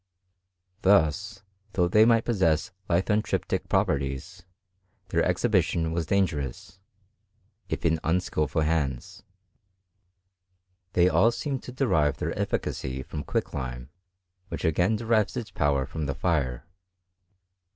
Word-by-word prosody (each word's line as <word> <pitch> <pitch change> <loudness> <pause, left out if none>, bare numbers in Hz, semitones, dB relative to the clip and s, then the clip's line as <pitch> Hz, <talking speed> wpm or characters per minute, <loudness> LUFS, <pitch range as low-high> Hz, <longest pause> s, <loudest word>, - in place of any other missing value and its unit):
Thus, 100 +2 +2 0.3
though 90 -2 +2
they 105 +5 +5
might 115 -1 +4
possess 90 -9 +1 0.2
lithontriptMl 105 +5 0
properties, 70 -1 -1 0.7
their - - +2
exhibition 80 -1 +1
was 80 -1 -2
dangerous, 90 -1 -1 0.9
if - - -3
in 80 -1 +2
iijP* 90 +3 0
skilful 75 -1 0
hands. 75 -6 -2 1.7
They 90 0 +4
all 90 +6 +4
seemed 135 +2 -3
to - - -9
derive 80 - +1
their - - -2
eftj - - -1
cacy 65 0 -4
from 75 - -5
quicklime, 65 -2 -4 0.6
which - - -5
again 90 +7 +2
derives 110 0 +1
its 120 -3 -5
powtf 70 -1 0
from 80 -3 -3
the 70 - -2
fire. 70 -5 -1
80 Hz, 115 wpm, -27 LUFS, 70-100 Hz, 1.7 s, they